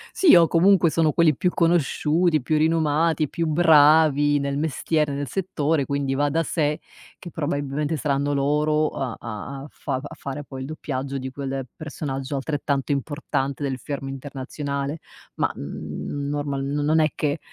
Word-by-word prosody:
Sì 370 - +6
o 170 - +7
comunque 175 +1 +4
sono 155 -1 +2
quelli 165 -3 +4
più 180 +7 +1
conosciuti, 165 -1 +2
più 155 +4 +1
rinomati, 160 0 +2
più 165 - -2
bravi 150 -2 +5
nel 140 0 -2
mestiere, 155 -1 0
nel 140 +1 -3
settore, 160 -5 -1
quindi 140 -1 -1
va 145 +2 +1
da 160 +3 +1
sé 150 -1 -1 0.4
che 175 - -9
probabilmente 145 0 -2
saranno 145 -1 0
loro 150 +2 +1
a 130 -3 -4
a 115 +5 -7
a - - -8
fav 130 - -4
a - - -9
fare 140 +1 -6
poi 135 -1 -8
il 130 - -5
doppiaggio 140 -2 -4
di 130 -1 -4
quel 135 -1 -4
personaggio 140 -2 -5
altrettanto 140 0 -1
importante 140 -1 -2
del 135 -2 -2
fermo 135 +1 -5
internazionale 140 +2 -4 0.4
ma, - - +1
mhmm, 140 - -5
normal 145 -1 -2
n 140 +1 -3
non 155 +2 +3
è 155 - +4
che 150 +1 -1
145 Hz, 160 wpm, -23 LUFS, 140-155 Hz, 0.4 s, o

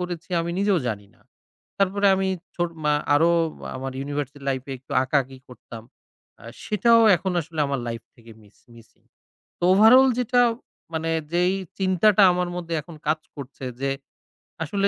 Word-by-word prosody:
করেছি 175 -1 -6
আমি 170 +1 -3
নিজেও 200 -2 +2
জানি 105 -3 -4
না। - - -30 0.6
তারপরে 200 +1 +1
আমি 190 0 -1 0.3
ছোট 175 -1 -1
মা 150 - +3 0.2
আরো 165 +4 +4 0.5
আমার 135 +1 -5
ইউনিভার্সিটি 145 0 -5
লাইফ 130 -2 -1
এ - - -3
একটু 130 - -12
আঁকাআঁকি 135 0 -1
করতাম। 115 -2 -11 0.6
অ্যা - - -15 0.2
সেটাও 230 +3 +4 0.2
এখন 185 +3 -3
আসলে 160 0 -6
আমার 140 -2 -2
লাইফ 115 -1 -5
থেকে 115 -1 -17
মিস 105 -1 -23 0.2
মিসিং। 115 -1 -19 0.6
তো - - -6
ওভারঅল 240 +7 +7
যেটা 245 0 +2 0.5
মানে 165 0 -2 0.2
যেই 180 +2 +2 0.3
চিন্তাটা 190 +2 +4
আমার 180 0 -1
মধ্যে 170 -1 -5
এখন 165 +2 -13
কাজ 155 +1 +1 0.2
করছে 140 -1 -9 0.2
যে 140 - 0 0.7
আসলে 200 +6 0
165 Hz, 155 wpm, -23 LUFS, 135-190 Hz, 0.7 s, ওভারঅল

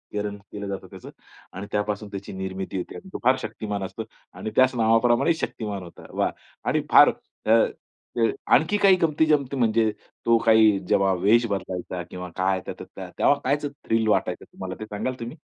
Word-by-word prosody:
करण 105 0 -2
केलं 100 -1 -6
जातं 100 -1 -5
त्याचं. - - -11 0.4
आणि 100 +2 -6
त्यापासून 105 0 -2
त्याची 100 0 -7
निर्मिती 95 0 -4
होते 90 - -5
आणि 190 - -10
तो - - -4
फार 130 +2 +5
शक्तिमान 105 -5 -4
असतो 95 +4 -5 0.3
आणि 110 - -5
त्याच 130 0 +4
नावाप्रमाणे 120 +6 +3
शक्तिमान 105 - -4
होता. 85 - -13
वा! - - 0 0.4
आणि - - +1
फार - - +9
अ, 110 - -5 0.7
ते 115 -1 +3 0.2
आणखी 205 +7 +4
काही 195 -2 +6
गमती-जमती 150 -4 +2
म्हणजे 110 -2 +2 0.3
तो 115 0 +5
काही 110 -3 +6
जेव्हा 95 0 +3
वेश 105 +6 +3
बदलायचा 95 -3 -4
किंवा 90 0 -7
काय, 95 0 +1
त्या - - -3 0.4
तेव्हा - - +5
कायचं 145 +2 0 0.2
थ्रिल 115 0 +1
वाटायचं 105 - 0
तुम्हाला? 95 0 -7
ते 110 - -5
सांगाल 105 +4 -3
तुम्ही? 120 +7 -7
110 Hz, 170 wpm, -25 LUFS, 95-120 Hz, 0.7 s, फार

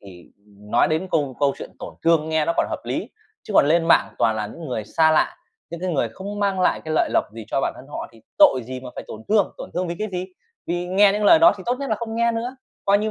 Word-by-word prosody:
thì 90 -4 -14 0.4
nói 120 - +3
đến 160 +4 -1
câu 140 -5 0
câu 140 -1 +2
chuyện - - -8
tổn - - -8
thương 165 -2 +3
nghe 160 -1 +1
nó 170 - +1
còn - - +2
hợp - - -3
lý. - - -3 0.3
Chứ - - -8
còn 140 - +6
lên 165 +2 +3
mạng - - +4
toàn 110 -1 +2
là 105 -1 -2
những 160 +9 -9
người 110 -4 -3
xa 160 +7 +3
lạ, 155 - +2 0.3
những 170 - -6
cái 185 0 -2
người 130 -5 0
không 200 - -7
mang 195 -2 0
lại 185 - +2
cái 155 - -3
lợi - - +2
lộc - - +3
gì 115 - -8
cho - - 0
bản - - -1
thân 130 - -12
họ 145 - -6
thì 115 - -18 0.2
tội 130 - +6
gì 130 0 -6
mà 125 -1 -9
phải - - -7
tổn 110 - -9
thương, 210 -2 +2
tổn - - -8
thương 180 0 -1
vì 170 - -3
cái 215 - -2
gì? 180 +1 -3 0.4
Vì 175 +1 -2
nghe 195 +2 +4
những 210 0 -1
lời 320 - +7
đó 335 +2 +7
thì - - -9
tốt 245 - +2
nhất 275 -3 -4
là 220 - +1
không 225 0 -5
nghe 235 0 +2
nữa, 240 +3 -4 0.3
coi 200 +1 +4
như 215 +1 -1
170 Hz, 290 wpm, -22 LUFS, 135-205 Hz, 0.4 s, lời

